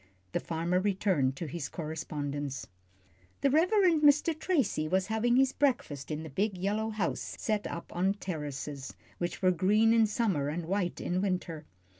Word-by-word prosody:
the - - 0
farmer 170 +2 0
returned 185 -9 +1
to 165 - -5
his 150 0 -5
correspondence. 145 -4 -4 0.8
The 275 - +3
Reverend 345 +1 +4
Mr. 300 +2 +5
Tracy 290 - 0
was 185 +3 +1
having 240 +2 +2
his 265 0 +4
breakfast 245 - 0
in 155 0 -3
the 160 - -7
big 195 +6 0
yellow 210 +4 -1
house 210 -6 -2
set 215 -2 -1
up 170 - -7
on 190 +3 +2
terraces, 150 -6 -5 0.2
which 175 +2 -3
were 185 - +6
green 210 +6 +4
in 225 -1 +5
summer 200 - 0
and 165 +2 -3
white 180 0 -1
in 180 +1 -1
winter. 180 -5 -2
185 Hz, 160 wpm, -30 LUFS, 155-220 Hz, 0.8 s, were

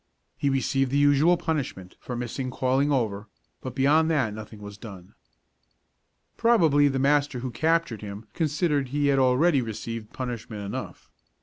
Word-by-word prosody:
He 140 - 0
received 135 0 +1
the 140 - 0
usual 145 +4 +4
punishment 140 - -4
for 125 - -6
missing 125 +2 -4
calling 130 +3 +1
over, 110 -6 -1 0.3
but 130 -2 -7
beyond 150 +4 +3
that 130 -10 +1
nothing 110 0 -9
was 100 0 -9
done. 95 -6 -11 1.2
Probably 165 -12 +4
the 135 -1 0
master 140 -1 +1
who 130 -1 -4
captured 160 -3 0
him 105 +1 -8
considered 150 -3 0
he 145 +2 0
had 135 - +2
already 135 +4 +3
received 115 -1 -6
punishment 115 -5 -5
enough. 100 - -7
135 Hz, 145 wpm, -26 LUFS, 115-145 Hz, 1.2 s, usual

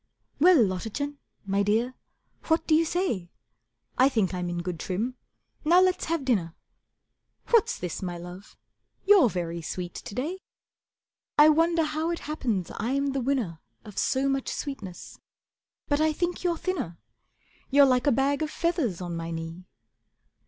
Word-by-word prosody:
"Well, 355 +3 +7
Lottachen, 230 +7 -1 0.3
my 200 +1 +1
Dear, 225 +5 +1 0.5
what 320 0 +1
do 315 - +2
you 325 +1 +5
say? 315 - -1 0.7
I 260 +2 +6
think 215 -9 0
I'm 180 -1 -2
in 175 0 -3
good 175 -2 -4
trim. 210 +10 -2 0.5
Now 340 +4 +6
let's 370 0 +2
have 325 -4 -1
dinner. 185 -10 0 1.0
What's 460 -4 +4
this, 180 -2 -5
my 175 -2 -4
Love, 180 +3 -11 0.5
you're 395 - +7
very 170 -3 -3
sweet 175 +2 -5
to 200 - -8
day. 320 +9 -3 1.0
I 300 +1 +8
wonder 330 +2 +3
how 310 +1 -1
it 340 - -3
happens 235 - -2
I'm 275 +5 0
the 270 0 -1
winner 240 - -1 0.3
Of 210 - -6
so 270 +1 +1
much 270 -1 0
sweetness. 210 -11 -6 0.7
But 290 +1 +1
I 310 0 +3
think 350 +3 -2
you're 345 -2 +1
thinner; 320 - -3 0.7
You're 280 0 +7
like 255 0 +2
a - - +6
bag 275 +4 +1
of 310 - -1
feathers 310 - -1
on 175 -1 -4
my 165 0 -4
knee. 165 +2 -6
260 Hz, 155 wpm, -27 LUFS, -, 1.0 s, I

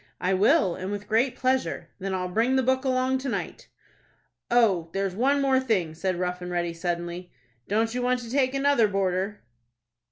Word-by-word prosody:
"I 185 +1 0
will, 200 - +3
and 185 +2 -5
with 205 0 -5
great 235 +4 +1
pleasure." 260 0 -1
"Then 195 0 -3
I'll 180 -1 -2
bring 230 +8 +1
the 265 - +2
book 260 +1 +1
along 260 0 +1
to 270 +1 -4
night." - - -5 0.8
"Oh, 200 -9 +3
there's 195 -1 -1
one 260 +8 +2 0.3
thing 220 -9 +1
more," - - -11
said 185 +3 -2
Rough 180 0 -3
and 180 - -5
Ready, 175 -1 -1
suddenly. 175 +1 -4 0.4
"Don't 225 +3 0
you 250 - -2
want 250 0 +1
to 235 -1 -9
take 265 0 +1
another 275 -5 +3
boarder?" 195 +1 -1
205 Hz, 185 wpm, -26 LUFS, 180-255 Hz, 0.8 s, will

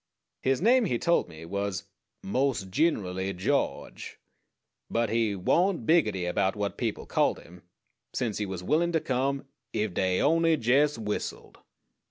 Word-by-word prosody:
His 135 +5 +1
name, 245 +2 +5
he 125 - 0
told 170 - +1
me, 80 0 -10
was 100 +1 -3 0.4
"mos' 130 +2 0
gin'rally 95 - 0
George"; 90 +1 -2 0.7
but 115 -2 0
he 115 -3 +1
"warn't 170 - +1
biggetty" 105 - +2
about 95 +2 +1
what 105 -1 -2
people - - -3
called - - +1
him, 90 +1 -14 0.5
since 115 -5 -2
he 105 - -2
was 95 -2 -5
willin' 170 - +1
to 160 - +3
come 135 0 -1 0.3
"ef 105 -3 -1
dey 90 0 +1
on'y 165 +2 +3
jes' 140 +3 +2
whistled." 105 -2 -5
110 Hz, 145 wpm, -28 LUFS, 95-150 Hz, 0.7 s, name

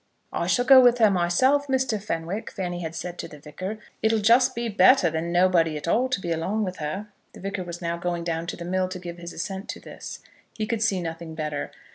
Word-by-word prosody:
"I - - -1
shall 245 - +2
go 265 0 +9
with 245 -1 +5
her 220 -3 +5
myself, 225 +11 +2
Mr. 265 -5 0
Fenwick," 185 +1 -3
Fanny 175 -3 -4
had 165 -1 -5
said 175 +1 -6
to - - -4
the 150 - -12
Vicar; 185 +8 -6 0.2
"it'll 220 0 +3
just 240 +5 +4
be 235 0 -2
better 215 -3 +5
than 160 +2 -2
nobody 175 -3 +3
at 150 - -7
all 245 +9 +2
to 255 - 0
be 175 -3 -4
along 190 +7 -1
with 185 -2 -4
her." 190 +8 -4 0.2
The - - -12
Vicar 195 0 -4
was 175 0 -7
now 170 0 -1
going 175 0 -2
down 165 0 -2
to - - -4
the 170 - -7
mill 185 +1 0
to 185 - -5
give 175 -1 -8
his 170 0 -7
assent 195 +4 -5
to - - -5
this. - - -9 0.3
He 215 - -1
could 225 0 -2
see 200 -5 +1
nothing 165 -1 -6
better. 150 -2 -3
185 Hz, 235 wpm, -25 LUFS, 170-220 Hz, 0.3 s, go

